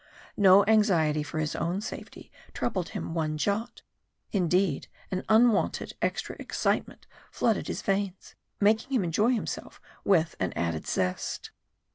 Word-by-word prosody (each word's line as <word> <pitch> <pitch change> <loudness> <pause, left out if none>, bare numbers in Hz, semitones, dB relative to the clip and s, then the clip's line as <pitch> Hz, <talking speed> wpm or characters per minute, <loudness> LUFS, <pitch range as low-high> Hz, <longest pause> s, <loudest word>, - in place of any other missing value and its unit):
No 195 0 +6
anxiety 175 -9 +3
for 150 +2 -6
his 155 -1 -1
own 175 +3 -1
safety 215 - -8 0.2
troubled 185 -7 -2
him - - -5
one 155 -2 -1
jot 215 +8 -2 0.5
indeed, 180 -4 +1 0.2
an 185 -1 -2
unwonted 220 -1 +3
extra - - -2
excitement - - -2 0.2
flooded 225 -3 0
his - - -4
veins, 195 -1 -2 0.3
making 220 +6 +2
him 225 - +2
enjoy 180 +7 +2
himself 225 - -5 0.2
with 165 -5 +2
an 95 -2 -1
added 85 -2 -2
zest. 90 0 -2
190 Hz, 130 wpm, -28 LUFS, 160-210 Hz, 0.5 s, No